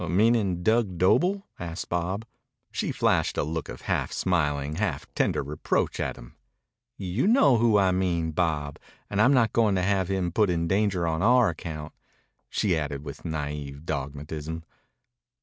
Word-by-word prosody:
"Meanin' 100 Hz, -2 st, +2 dB
Dug 110 Hz, -4 st, +2 dB
Doble?" 180 Hz, -, +3 dB
asked 85 Hz, 0 st, -5 dB
Bob. 90 Hz, +5 st, -2 dB, 0.5 s
She -, -, -2 dB
flashed -, -, +1 dB
a -, -, +2 dB
look 80 Hz, +2 st, -4 dB
of -, -, -8 dB
half -, -, -1 dB
smiling, 75 Hz, -4 st, 0 dB
half 105 Hz, +1 st, -1 dB
tender -, -, +1 dB
reproach 75 Hz, +2 st, -1 dB
at -, -, -2 dB
him. -, -, -14 dB, 0.6 s
"You 95 Hz, -, -1 dB
know 175 Hz, -, +5 dB
who 115 Hz, -2 st, +4 dB
I 95 Hz, -2 st, +4 dB
mean, 85 Hz, -3 st, 0 dB
Bob. 75 Hz, -3 st, -1 dB, 0.3 s
And 105 Hz, +1 st, +2 dB
I'm 125 Hz, -, +6 dB
not 115 Hz, -4 st, +3 dB
going 110 Hz, -4 st, +3 dB
to 90 Hz, -, +1 dB
have 95 Hz, -1 st, +1 dB
him 95 Hz, -2 st, -1 dB
put 105 Hz, +2 st, +2 dB
in 85 Hz, -1 st, 0 dB
danger 95 Hz, -2 st, +1 dB
on 80 Hz, 0 st, -1 dB
our 120 Hz, +1 st, +5 dB
account," 75 Hz, -2 st, -6 dB, 0.6 s
she 95 Hz, -5 st, +1 dB
added 70 Hz, -2 st, -3 dB
with 70 Hz, -2 st, -8 dB
naïve 75 Hz, -3 st, -5 dB
dogmatism. 75 Hz, +2 st, -4 dB
90 Hz, 160 wpm, -26 LUFS, 75-105 Hz, 0.6 s, I'm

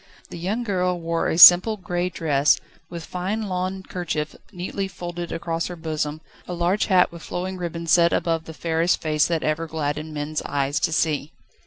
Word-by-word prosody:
The -, -, -7 dB
young 205 Hz, +8 st, -2 dB
girl 180 Hz, -4 st, -1 dB
wore 165 Hz, 0 st, -1 dB
a -, -, -1 dB
simple 180 Hz, +5 st, +9 dB
grey 180 Hz, -1 st, -2 dB
dress, 150 Hz, -4 st, +2 dB, 0.3 s
with 170 Hz, -2 st, -7 dB
fine 190 Hz, +5 st, -3 dB
lawn 190 Hz, -1 st, -3 dB
kerchief 155 Hz, -5 st, -4 dB, 0.2 s
neatly 195 Hz, +1 st, -4 dB
folded 175 Hz, -2 st, -6 dB
across 165 Hz, 0 st, -3 dB
her 180 Hz, -, -7 dB
bosom, 155 Hz, -2 st, -3 dB, 0.3 s
a 180 Hz, -, -4 dB
large 175 Hz, +4 st, +1 dB
hat 185 Hz, -3 st, +4 dB
with 170 Hz, -1 st, -11 dB
flowing 185 Hz, +3 st, -4 dB
ribbons 170 Hz, -2 st, -4 dB
sat 170 Hz, -1 st, +5 dB
above 165 Hz, -1 st, 0 dB
the 160 Hz, -, -9 dB
fairest 165 Hz, +2 st, 0 dB
face 155 Hz, -1 st, +1 dB
that 165 Hz, -2 st, -1 dB
ever 155 Hz, +2 st, -1 dB
gladdened 155 Hz, 0 st, -3 dB
men's 150 Hz, +1 st, -3 dB
eyes 140 Hz, 0 st, -1 dB
to -, -, 0 dB
see. 155 Hz, -1 st, 0 dB
170 Hz, 180 wpm, -23 LUFS, 155-180 Hz, 0.3 s, simple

